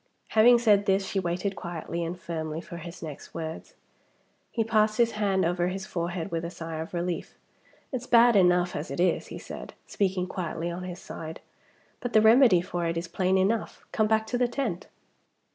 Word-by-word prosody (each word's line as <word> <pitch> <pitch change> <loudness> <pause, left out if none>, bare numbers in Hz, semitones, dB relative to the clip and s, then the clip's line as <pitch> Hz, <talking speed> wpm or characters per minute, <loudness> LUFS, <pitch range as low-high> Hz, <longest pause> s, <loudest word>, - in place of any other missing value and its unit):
Having 240 +3 +6
said 210 -4 +4
this, 195 0 +2
she 195 - -1
waited, 185 +2 -2
quietly 170 -1 -4
and 170 +2 -4
firmly, 160 -2 -4
for 170 0 -9
his 170 +1 -9
next 150 -3 -9
words. 165 - -6 0.7
He 225 - 0
passed 215 -1 +2
his 235 -1 +4
hand 195 -3 +1
over 175 +1 +1
his 190 +1 -4
forehead 175 +1 -3
with 165 -1 -2
a 170 - -3
sigh 165 -2 -6
of 160 - -5
relief. 175 0 -3 0.5
"It's 255 -2 -4
bad 235 0 +6
enough 180 -2 +4
as 150 - -4
it 140 - -5
is," 180 -1 +2
he - - -7
said, - - -9
speaking 190 -2 0
quietly 170 -2 -4
on 180 +1 -5
his 180 -1 -6
side. 160 0 -8 0.6
"But 245 - -4
the 215 - +6
remedy 220 -4 +6
for 175 -1 -3
it 165 0 -1
is 170 +1 -3
plain 185 +2 +1
enough. 205 +4 0
Come 215 - +2
back 220 0 +2
to 245 +2 -2
the 245 - +3
tent." 235 -8 -3
180 Hz, 195 wpm, -27 LUFS, 170-215 Hz, 0.7 s, Having